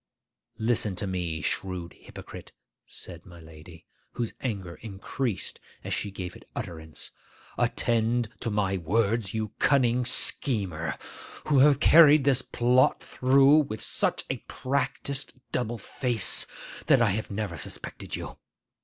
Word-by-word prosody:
'Listen 110 -3 +1
to 95 - -2
me, 90 -4 -3
shrewd 90 +1 -3
hypocrite,' - - -11 0.3
said 85 -2 -11
my 85 -2 -13
lady, 80 +1 -14 0.3
whose 120 -2 -3
anger 95 -9 -4
increased 110 +1 -4 0.2
as - - -3
she 105 - -2
gave 95 -2 -6
it - - -16
utterance; 80 -8 -5 0.4
'attend 115 0 +1
to 115 - -2
my 100 -2 0
words, 105 +4 0
you 110 -1 -1
cunning 125 -3 +3
schemer, 100 - -1 0.5
who 145 -3 +3
have 140 0 +6
carried 155 -2 +7
this 135 -2 +4
plot 125 +1 +3
through 135 +3 +5
with 135 -8 -2
such - - -1
a - - -2
practised 135 +1 -2 0.2
double 120 -1 -1
face 120 +1 0 0.4
that 135 -4 +6
I 115 -4 +3
have 110 +3 -3
never 100 -3 -3
suspected - - -5
you. - - -7
110 Hz, 130 wpm, -27 LUFS, 95-130 Hz, 0.5 s, carried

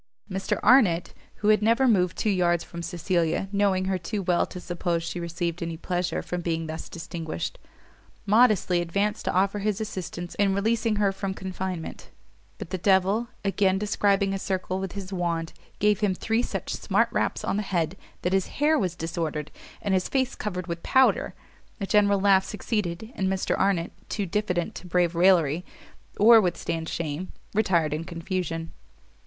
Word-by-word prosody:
Mr 195 +1 -2
Arnott, 190 -10 +5 0.2
who 210 - 0
had 215 -1 +5
never 230 +5 +3
moved 180 -7 +2
two 215 - +1
yards 175 -3 +2
from 170 - -8
Cecilia, 170 +1 0
knowing 200 -2 +2
her 190 -1 0
too 195 +4 -3
well 175 -1 +2
to 180 - -8
suppose 175 -1 -2
she 175 - -4
received 170 0 -3
any 165 -1 -3
pleasure 180 +1 -2
from 180 0 -3
being 165 -1 -1
thus 160 0 -6
distinguished, 165 - -5 0.7
modestly 210 -5 +4
advanced 200 +5 -1
to - - +1
offer 195 +2 +1
his 205 -1 -1
assistance 180 -4 -5
in 195 -1 +3
releasing 220 +2 +1
her 205 -1 +2
from 195 0 -4
confinement; 185 -3 -5 0.5
but - - -8
the 185 - -2
devil, 195 +5 +3 0.2
again 195 -1 +2
describing 200 -1 +1
a 195 - -2
circle 185 -1 -2
with 190 -1 -4
his 195 -1 -6
wand, 170 -2 -2 0.2
gave 210 -1 +3
him 205 -3 +1
three 225 +4 0
such - - -3
smart - - +1
raps - - -1
on - - 0
the - - +1
head 175 -4 -1 0.3
that 180 - 0
his 195 -1 +2
hair 300 +1 +3
was 180 -6 -1
disordered, 160 -2 -3 0.3
and 200 -2 0
his 185 -1 +1
face 260 -2 +1
covered 180 -4 -4
with 170 -1 -5
powder. 260 0 +3 0.4
A 200 - -2
general 205 0 +3
laugh 190 -1 +5
succeeded, 210 -1 -3
and 190 - 0
Mr 190 0 0
Arnott, 190 -4 +1 0.2
too 205 - -1
diffident 180 -2 -1
to 180 - -10
brave 175 -1 +2
raillery, 170 -3 +4 0.6
or 225 +2 +8
withstand 165 -3 -2
shame, 165 +2 -4 0.2
retired 175 -8 +2
in 155 +2 -2
confusion. 165 -1 -4
185 Hz, 170 wpm, -26 LUFS, 170-205 Hz, 0.7 s, or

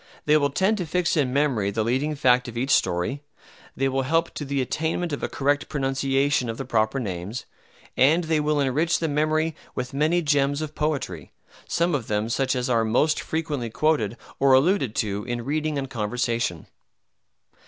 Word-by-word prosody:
They 150 - +4
will 145 -2 +3
tend 195 +9 +1
to 175 - -3
fix 175 +2 +1
in 140 -5 +1
memory 130 -8 +1
the 110 +2 -1
leading 135 +7 0
fact 125 -3 +3
of 120 -1 -7
each 130 +3 -1
story, 90 +8 +1 0.5
they 135 - +1
will 135 0 0
help 165 +5 +1
to - - -5
the 140 -1 -2
attainment 160 +5 -1
of 145 - -3
a - - -2
correct 145 +1 0
pronunciation 135 -1 0
of 115 - -4
the 135 - -5
proper 110 +1 +1
names, 100 +1 -5 0.5
and 155 +7 +4
they 160 -1 +1
will 150 0 +1
enrich 145 +5 +1
the 165 - -1
memory 155 +1 0 0.2
with 125 +1 -4
many 155 +5 +2
gems 145 -1 +2
of 155 -1 -6
poetry, 140 - -3 0.3
some 170 +1 +1
of 135 -6 -2
them 105 +1 -1
such 130 +2 0
as 125 -1 -1
are 115 -3 +2
most 125 +8 +2
frequently 150 -7 -3
quoted 120 -4 0 0.2
or 135 -1 +5
alluded 135 - +3
to 105 -1 -1
in 120 -1 -4
reading 155 +1 -1
and 135 -1 -4
conversation. 115 -5 -2
135 Hz, 185 wpm, -24 LUFS, 120-155 Hz, 0.5 s, or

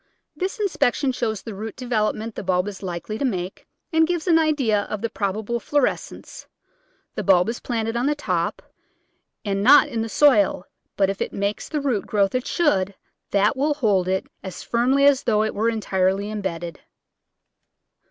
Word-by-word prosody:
This 390 +5 -3
inspection 295 -9 +1
shows 220 -5 -3
the 225 - -7
root 215 +3 -6
development 225 -2 -1
the - - -5
bulb 185 0 0
is 200 -2 -7
likely 185 +3 -5
to - - -2
make, 185 -7 -3 0.3
and 320 0 +4
gives 345 -2 -2
an 335 -3 +4
idea 275 -10 +2
of 215 0 -4
the 230 - -1
probable 215 +4 -2
florescence. 290 +2 -2 0.7
The - - -3
bulb 185 +1 +4
is 235 - -4
planted 225 -2 -2
on 240 +3 +1
top, 290 - -2 0.8
and 195 -1 -1
not 265 +7 +7
in 230 - -2
the 225 - -3
soil, 215 -9 +4 0.3
but 195 -1 +3
if 195 - -8
it - - -2
makes 200 +1 -2
the 300 -2 -2
root 255 -8 -1
growth 200 -2 +1
it 255 +2 -1
should 200 - +1 0.3
that 205 +5 +2
will 290 +2 +1
hold 205 -10 +1
it 190 0 0 0.2
as 190 - -7
firmly 260 +4 +2
as 285 -1 +5
though 215 -2 +2
it 220 - -2
were 220 +3 +1
entirely 200 -2 0
em 215 -1 -4
bedded. 170 -4 -5
220 Hz, 175 wpm, -23 LUFS, 195-265 Hz, 0.8 s, not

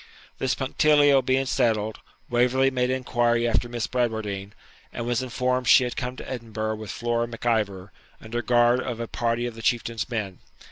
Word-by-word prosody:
This 130 -1 0
punctilio 145 0 +4
being 130 +1 +1
settled, 110 -5 0 0.3
Waverley 125 +2 +2
made 125 -1 0
inquiry 120 -2 +1
after 120 +1 0
Miss 120 -2 -2
Bradwardine, 110 -5 -2 0.4
and 120 - -5
was 120 +1 0
informed 125 0 -1
she 125 - +7
had 125 - -3
come 125 -1 -4
to - - -9
Edinburgh 110 -3 -4
with 110 -1 -8
Flora 120 0 -1
Mac 115 0 -9
Ivor, 100 -5 0 0.3
under 120 +2 -4
guard 120 0 +3
of 120 -2 -4
a 115 - -3
party 120 +1 -1
of 120 - -4
the 115 - -10
Chieftain's 115 -2 -1
men. 105 -6 -4
120 Hz, 175 wpm, -25 LUFS, 110-125 Hz, 0.4 s, she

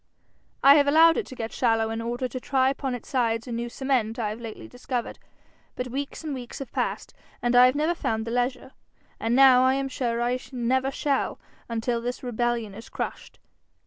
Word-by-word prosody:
I 280 +2 +9
have 285 -1 +4
allowed 325 +3 +6
it 455 - -2
to 260 - -9
get 225 -2 -5
shallow 225 -2 +1
in 225 0 -3
order 240 +2 -2
to 255 - -6
try 265 0 +2
upon 270 -2 -3
its 245 - -10
sides 230 -2 0
a - - -6
new 235 +1 -3
cement 245 -4 -1
I 220 -3 -1
have 215 +3 -6
lately 225 -2 -8
discovered; 245 -1 -5 0.6
but 250 0 -4
weeks 275 +5 -5
and 305 -2 -3
weeks 245 -3 -7
have 270 -4 -7
passed, - - -3 0.3
and 240 0 0
I 250 +1 +8
have 255 - +1
never 310 +4 +1
found 220 -9 -2
the 230 - -4
leisure, 245 +2 -1 0.5
and 230 +2 0
now 260 -1 +7
I 260 +1 +4
am 275 0 -1
sure 240 -3 -2
I 245 +1 0
never 260 +2 +1
shall 275 0 -1 0.3
until 230 +1 -1
this 245 +2 -4
rebellion 240 -3 -1
is 225 +3 -11
crushed. - - -6
245 Hz, 205 wpm, -26 LUFS, 230-265 Hz, 0.6 s, I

